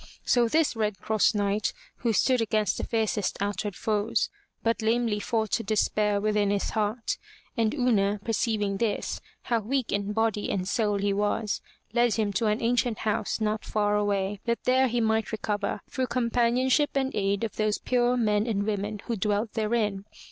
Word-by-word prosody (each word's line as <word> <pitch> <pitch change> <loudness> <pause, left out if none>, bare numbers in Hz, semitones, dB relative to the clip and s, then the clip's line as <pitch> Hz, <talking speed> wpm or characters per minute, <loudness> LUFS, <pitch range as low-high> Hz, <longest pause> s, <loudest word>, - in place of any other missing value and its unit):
So 240 -2 +4
this 310 +2 +2
Red 210 -2 -1
Cross 215 0 +2
Knight, 205 0 0 0.2
who 235 - 0
stood 250 +3 +3
against 215 -3 +1
the - - -3
fiercest 220 -3 0
outward 205 0 -2
foes, 215 +1 0 0.3
but 230 0 +1
lamely 225 -1 +1
fought 220 -1 0
despair 210 0 +1
within 210 -1 +1
his 200 -1 0
heart, 215 +1 -1 0.4
and 225 -2 +2
Una, 210 -6 +2
perceiving 215 -3 0
this, 220 0 -1 0.2
how 235 -1 +1
weak 250 +3 -1
in 200 0 -1
body 220 -1 0
and 185 -2 -1
soul 210 -1 +1
he 200 0 0
was, 205 +1 0 0.3
led 240 -2 +3
him 210 -3 0
to 215 +3 +1
an 210 +2 0
ancient 235 -1 +1
house 215 +1 -1
not 215 0 -1
far 210 -1 0
away, 205 -1 0
that 235 0 -1
there 260 +1 +4
he 240 0 0
might 220 0 +1
recover, 210 -2 -2
through 260 -1 -2
companionship 245 +4 +2
and 265 -1 0
aid 200 +1 0
of 225 - -3
those 215 -1 +1
pure 245 0 +1
men 210 -1 +2
and 200 -3 0
women 205 0 -2
who 235 - -1
dwelt 210 +2 -1
therein. 215 -3 0
215 Hz, 170 wpm, -27 LUFS, 205-235 Hz, 0.4 s, So